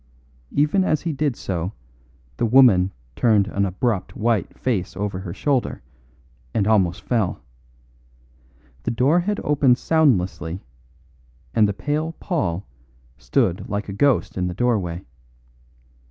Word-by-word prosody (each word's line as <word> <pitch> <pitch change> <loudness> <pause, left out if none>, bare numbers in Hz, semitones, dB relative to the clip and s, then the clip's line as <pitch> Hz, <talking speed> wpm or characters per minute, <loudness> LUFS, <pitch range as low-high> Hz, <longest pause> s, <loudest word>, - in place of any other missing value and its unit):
Even 150 +7 +2
as 155 -5 +1
he 165 -2 -1
did 145 -3 0
so 90 -1 -3 0.6
the - - +1
woman 110 -7 +6 0.2
turned 110 -4 +3
an 100 -1 0
abrupt 95 +1 -2
white 110 -4 0
face 100 -8 -2
over 100 -2 -2
her 95 -2 -6
shoulder 135 - -1 0.7
and 100 - +2
almost 95 -5 +2
fell. 110 -7 -1 1.4
The - - -2
door 130 +9 +3
had 205 +4 -1
opened 140 -4 +3
soundlessly 95 - +1 0.9
and 110 -2 +4
the 100 - -1
pale 150 +9 -2
Paul 100 - -2 0.5
stood 85 - 0
like 100 0 -3
a - - -4
ghost 130 -3 +1
in 90 - 0
the 90 - -4
doorway. 95 -8 0
110 Hz, 125 wpm, -22 LUFS, 95-140 Hz, 1.4 s, woman